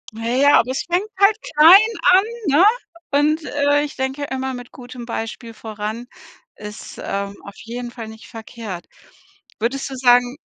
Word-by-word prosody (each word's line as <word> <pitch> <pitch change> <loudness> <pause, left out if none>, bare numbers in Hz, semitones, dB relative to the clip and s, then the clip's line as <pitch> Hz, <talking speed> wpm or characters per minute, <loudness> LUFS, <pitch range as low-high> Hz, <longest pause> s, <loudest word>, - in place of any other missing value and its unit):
Na 225 +1 -5
ja, 270 +4 +5
aber 240 - 0
es 260 - -2
fängt 360 +5 -1
halt 400 +2 +5
klein 370 +8 +6
an, 370 +2 +5 0.2
ne? 300 +5 +4 0.5
Und, 300 +3 +2
äh, 290 0 +1
ich 295 - -6
denke 265 +2 -3
immer 265 -1 -4
mit 245 -1 -9
gutem 245 -1 -10
Beispiel 230 0 -6
voran 220 +2 -6 0.5
ist, 210 0 -10
ähm, 200 0 -4
auf 200 - -11
jeden 240 +1 -6
Fall 235 -2 -9
nicht 220 0 -13
verkehrt. 220 -5 -8 0.7
Würdest 265 +6 -2
du 270 - -7
sagen 245 +1 +3
250 Hz, 160 wpm, -20 LUFS, 225-290 Hz, 0.7 s, klein